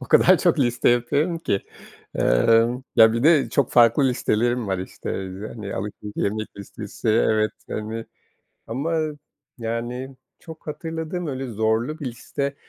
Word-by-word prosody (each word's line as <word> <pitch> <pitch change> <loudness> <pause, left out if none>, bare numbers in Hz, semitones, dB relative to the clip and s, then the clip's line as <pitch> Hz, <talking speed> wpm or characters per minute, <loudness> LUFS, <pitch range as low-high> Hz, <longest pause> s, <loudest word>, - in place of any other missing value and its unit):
o - - -7
kadar - - +6
çok - - +2
liste 120 0 +2
yapıyorum 140 +8 +1
ki. 100 -11 -1 0.5
Emm, 115 - +3
ya 110 -1 +8
bir 115 +2 -1
de 155 -2 +5
çok 140 -4 +1
farklı 120 +3 +5
listelerim 120 0 0
var, 95 -1 -1
işte, 95 - -6
eee, 95 +3 -7
hani, 105 -4 -6
alışveriş 105 +1 -6
yemek 110 +1 -2
listesi, 105 +2 -6
evet, 110 -1 +3 0.2
hani. 110 +1 -4 0.6
Ama, 140 +8 -2 0.6
yani, 120 +3 -4 0.2
çok 160 -2 -12
hatırladığım 160 +2 -4
öyle 135 -2 -4
zorlu 110 +6 0
bir 145 - -5
liste. 140 +3 -4
120 Hz, 140 wpm, -23 LUFS, 110-140 Hz, 0.6 s, ya